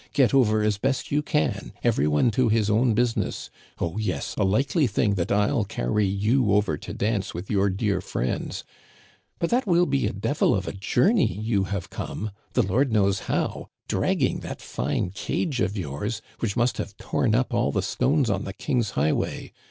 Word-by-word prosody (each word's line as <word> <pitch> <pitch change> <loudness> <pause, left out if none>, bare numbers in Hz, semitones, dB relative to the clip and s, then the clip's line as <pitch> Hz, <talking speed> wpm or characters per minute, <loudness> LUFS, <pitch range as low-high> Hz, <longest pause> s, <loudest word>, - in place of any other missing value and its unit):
* - - -40
Get 135 -3 +3
over 110 -5 +4
as 105 -2 +1
best 135 +3 -1
you 145 +1 +2
can; 150 0 -1
every 70 - +2
one 75 +11 +3
to 125 +1 +2
his 110 -1 +2
own 115 +1 +3
business. 120 0 -1 0.3
Oh, 85 +5 -2
yes, 90 -9 -2
a - - +1
likely 135 - +2
thing 105 -1 +1
that 90 -1 -1
rU 105 +2 +2
carry 100 +6 0
you 105 +3 +2
over 105 -6 +2
to - - -8
dance 105 -4 -1
with 90 +3 -6
your 100 -1 +3
dear 100 +1 0
friends; 60 - -3 0.7
but 170 - -1
that 245 -1 +1
will 175 -1 +4
be 65 - +1
a - - -1
devil - - +1
of - - -3
a - - -1
journey 145 - +2
you 105 -1 0
have 95 -2 -4
come, 105 0 -5 0.2
the 125 - +3
Lord 120 +7 +1
knows 100 -3 +2
how, - - -1 0.2
dragging - - +1
that - - -7
fine 90 - -2
cage 130 - -2
of 105 0 0
yours, 95 +7 -4 0.2
which 115 -1 -2
must 120 +1 +1
have - - -5
torn - - 0
up - - 0
all - - +1
the - - -1
stones 135 +1 +1
on 100 -3 0
the 95 - -5
king's 120 0 -1
high 75 +3 +3
way - - -3
105 Hz, 195 wpm, -25 LUFS, 95-125 Hz, 0.7 s, over